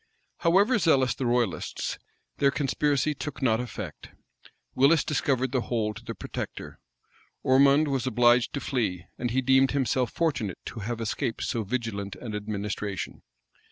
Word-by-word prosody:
However 200 +8 +3
zealous 135 - +3
the 125 +2 -2
royalists, 120 -9 -1 0.4
their 140 - +4
conspiracy 145 +2 +1
took 150 0 -6
not 115 -4 +2
effect: 110 -9 -6 0.6
Willis 145 +4 +4
discovered 130 -3 0
the 130 -2 +1
whole 110 -3 -1
to 125 - -11
the 115 -1 -6
protector. - - -6 0.6
Ormond 140 +3 +5
was 135 -2 -1
obliged 120 -1 +4
to 140 - -2
fly, 100 -9 -1
and 120 - -1
he 130 +3 0
deemed 130 +1 +4
himself 130 -3 +1
fortunate 130 - -1
to 115 - -6
have 115 +2 -4
escaped 115 +1 -2
so 115 - -1
vigilant 100 -3 -3
an 115 -4 -7
administration. 105 -1 -4
125 Hz, 145 wpm, -27 LUFS, 110-140 Hz, 0.6 s, Ormond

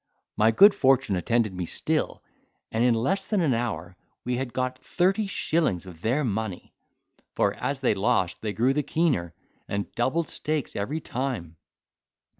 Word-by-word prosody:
My 110 +1 +4
good 200 - +7
fortune 130 -6 +3
attended 110 +3 +1
me 90 -2 -4
still, - - -2 0.5
and 115 +1 +1
in 120 -1 +4
less 190 +13 0
than 210 - +1
an 155 -7 +2
hour 105 -7 -3 0.3
we 125 0 0
had 130 -1 -3
got 130 0 -2
thirty 195 +4 +1
shillings 155 - 0
of 85 -3 -12
their 125 +8 +1
money, 110 -5 -3 0.6
for - - +2
as 140 -1 -3
they 130 - +3
lost 95 -3 0
they 110 - -2
grew 120 +6 +2
the 150 - +1
keener, 135 - 0 0.3
and 100 0 -3
doubled 140 +7 0
stakes 155 -3 -2
every 140 +11 -2
time. 120 -11 -4
120 Hz, 160 wpm, -26 LUFS, 100-145 Hz, 0.6 s, good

